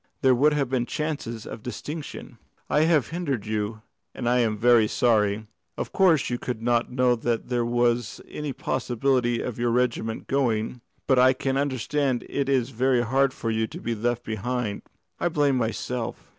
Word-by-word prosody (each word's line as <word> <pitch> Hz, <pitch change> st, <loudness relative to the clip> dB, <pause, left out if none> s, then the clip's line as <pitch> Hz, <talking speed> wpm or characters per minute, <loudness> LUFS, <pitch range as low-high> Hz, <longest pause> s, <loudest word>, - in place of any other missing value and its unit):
There 130 Hz, -1 st, +6 dB
would 145 Hz, +5 st, +4 dB
have 140 Hz, -2 st, +1 dB
been 125 Hz, -1 st, -1 dB
chances 140 Hz, -8 st, -3 dB
of 110 Hz, -, -7 dB
distinction. 140 Hz, 0 st, -7 dB, 0.3 s
I 150 Hz, +1 st, +4 dB
have 155 Hz, -7 st, +3 dB
hindered 145 Hz, -, -2 dB
you, 110 Hz, 0 st, -3 dB, 0.3 s
and 120 Hz, -, -3 dB
I 125 Hz, +1 st, +3 dB
am 110 Hz, -3 st, +1 dB
very 120 Hz, -1 st, +5 dB
sorry. 110 Hz, -2 st, +2 dB, 0.3 s
Of -, -, -4 dB
course, 175 Hz, -7 st, +4 dB
you 120 Hz, -1 st, -2 dB
could 125 Hz, -3 st, -4 dB
not 120 Hz, +1 st, +1 dB
know 125 Hz, -1 st, +3 dB
that 115 Hz, 0 st, -2 dB
there 120 Hz, -1 st, +1 dB
was 120 Hz, -1 st, 0 dB
any 150 Hz, -1 st, -4 dB
possibility 130 Hz, -3 st, 0 dB
of 120 Hz, -2 st, -5 dB
your 120 Hz, 0 st, +1 dB
regiment 115 Hz, -2 st, 0 dB
going, 120 Hz, -3 st, 0 dB, 0.2 s
but 130 Hz, -2 st, +4 dB
I 130 Hz, +1 st, +6 dB
can 135 Hz, +1 st, -2 dB
understand 135 Hz, -1 st, 0 dB
it 140 Hz, -1 st, -1 dB
is 130 Hz, -2 st, +1 dB
very 125 Hz, +1 st, +2 dB
hard 135 Hz, +3 st, +2 dB
for 115 Hz, -3 st, -3 dB
you 110 Hz, 0 st, 0 dB
to -, -, -9 dB
be 120 Hz, -, -2 dB
left 120 Hz, +2 st, -1 dB
behind. 110 Hz, 0 st, -3 dB, 0.4 s
I 175 Hz, -, +1 dB
blame 145 Hz, -4 st, +2 dB
myself." 115 Hz, 0 st, -3 dB
125 Hz, 175 wpm, -25 LUFS, 115-135 Hz, 0.4 s, There